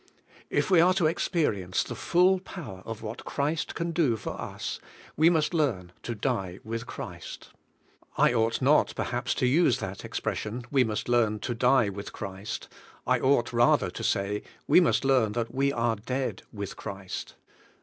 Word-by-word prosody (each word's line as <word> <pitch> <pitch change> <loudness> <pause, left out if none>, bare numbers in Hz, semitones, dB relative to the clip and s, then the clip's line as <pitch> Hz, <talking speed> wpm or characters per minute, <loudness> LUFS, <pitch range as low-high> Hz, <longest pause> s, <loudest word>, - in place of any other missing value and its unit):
If - - 0
we 175 -3 +7
are 180 +2 +4
to 190 - +1
expe 165 +1 +2
rience 90 -2 -1
the - - -5
full 185 +2 +3
power 145 - -8
of 115 -1 -6
what 110 +2 -6
Christ 150 +3 -2
can 170 0 -2
do 155 -9 +2
for - - -5
us, - - -5 0.4
we 160 +3 +5
must 160 -1 +1
learn 115 - 0
to 120 - -4
die 100 -6 -2
with 115 +2 -5
Christ. - - -8 0.7
I - - +4
ought 115 +2 +1
not, 145 +3 +4
perhaps, 125 0 -1
to 130 - +1
use 130 -1 +4
that 95 -5 -6
expression, 115 +3 -3
"We 135 -3 +4
must 110 -3 -3
learn 115 -3 +2
to 120 - -2
die 125 -2 +3
with 100 +1 -7
Christ;" 100 +3 -6 0.4
I - - +2
ought, 130 -3 +2
rather, 120 0 +3
to - - -6
say, 100 +1 0 0.3
"We - - +7
must 170 -5 +2
learn 125 -6 +3
that 115 0 -2
we 135 +1 +2
are 115 -3 0
dead 125 +5 -3
with 100 -3 -6
Christ." 95 -1 -6
120 Hz, 175 wpm, -28 LUFS, 105-145 Hz, 0.7 s, we